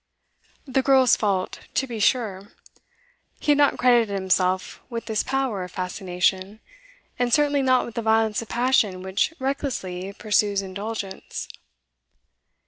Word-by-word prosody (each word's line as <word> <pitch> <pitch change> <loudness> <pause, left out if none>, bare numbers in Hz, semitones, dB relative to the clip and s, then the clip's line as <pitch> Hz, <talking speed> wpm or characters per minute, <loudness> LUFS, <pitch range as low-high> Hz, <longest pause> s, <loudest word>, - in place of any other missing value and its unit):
The 265 -1 +1
girl's 265 -1 +5
fault, 195 -3 -1 0.2
to 265 - +1
be 235 -4 -6
sure. 210 -3 0 0.9
He 295 - +1
had 290 - +4
not 285 - +4
credited 240 -3 +4
himself 185 -1 0
with 230 -2 -5
this 220 -2 0
power 260 -8 -1
of 180 - -9
fascination, 185 +2 -1 0.6
and 245 -1 +1
certainly 290 +1 +3
not 255 -1 +3
with 235 - -9
the 235 - -3
violence 220 -1 +2
of 230 - -10
passion 235 -7 +1
which 190 +9 0
recklessly 240 -9 -3
pursues 205 -2 +1
indulgence. 200 0 -6
220 Hz, 135 wpm, -24 LUFS, 190-255 Hz, 0.9 s, girl's